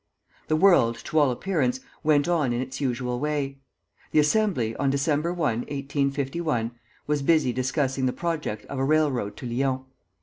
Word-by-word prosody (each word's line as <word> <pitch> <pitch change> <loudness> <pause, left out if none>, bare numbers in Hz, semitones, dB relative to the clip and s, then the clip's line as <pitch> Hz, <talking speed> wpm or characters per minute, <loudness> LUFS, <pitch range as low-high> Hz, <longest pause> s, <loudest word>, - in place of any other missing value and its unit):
The 155 - +2
world, 155 -10 +5
to 155 - +1
all 145 -3 +4
appearance, 130 -2 0 0.2
went 150 0 +3
on 155 -8 +1
in 120 - -1
its 130 +2 -5
usual 125 -2 -1
way. 140 -1 -2 0.5
The - - -1
Assembly, 150 - +2
on 140 0 +1
December 150 +4 +1
1, 150 -10 0
1851, 140 -1 -1 0.3
was 150 -1 0
busy 150 -4 +3
discussing 130 +1 0
the - - +1
project 150 -10 -3
of 140 - -5
a - - +1
railroad 140 -8 +1
to - - -8
Lyons. 130 +2 0
140 Hz, 160 wpm, -25 LUFS, 130-155 Hz, 0.5 s, world